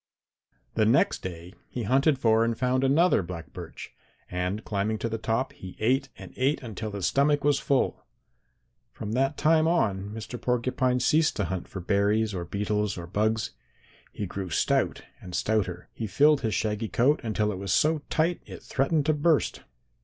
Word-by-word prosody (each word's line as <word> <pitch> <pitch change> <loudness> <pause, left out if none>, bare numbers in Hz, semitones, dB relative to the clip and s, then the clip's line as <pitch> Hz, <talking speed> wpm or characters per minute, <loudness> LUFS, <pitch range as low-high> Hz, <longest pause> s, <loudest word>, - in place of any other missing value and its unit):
"The 110 - +2
next 120 +5 +3
day 90 0 -7 0.2
he 120 - -4
hunted 135 +6 +3
for 115 -3 +3
and 115 -1 0
found 130 +1 +1
another 150 - +4
black 85 -2 -8
birch, - - -9 0.4
and 90 +4 -2
climbing 105 +1 -1
to 115 - -3
the 115 0 -3
top, 115 +4 -1
he 95 -1 -10
ate 130 +5 +1
and 95 -2 -11
ate 135 +4 +1
until 110 -2 -5
his 100 -3 -2
stomach 145 +1 +2
was 145 -1 +3
full. 135 -2 0 0.9
From 105 -1 -6
that 135 +4 +1
time 155 +1 +4
on 100 - +1
Mr. 110 +2 -7
Porcupine 125 +1 +1
ceased 155 +4 +3
to 105 - -1
hunt 90 0 -3
for 95 - -7
berries 105 +3 +1
or 90 -2 -4
beetles 105 +2 -1
or 85 - -6
bugs. 110 +4 0 0.6
He 105 - -4
grew 95 0 -5
stout - - +1 0.2
and 90 -1 -7
stouter. 95 -5 -1
He 110 - -4
filled 145 +8 +4
his 110 -3 -1
shaggy 105 0 -1
coat 140 +6 +3
until 110 -2 0
it 95 - -5
was 100 0 -3
so 155 +1 +3
tight 165 +2 +1
it - - -10
threatened 140 +2 0
to 155 - +3
burst. 150 +1 +1
110 Hz, 175 wpm, -27 LUFS, 100-135 Hz, 0.9 s, another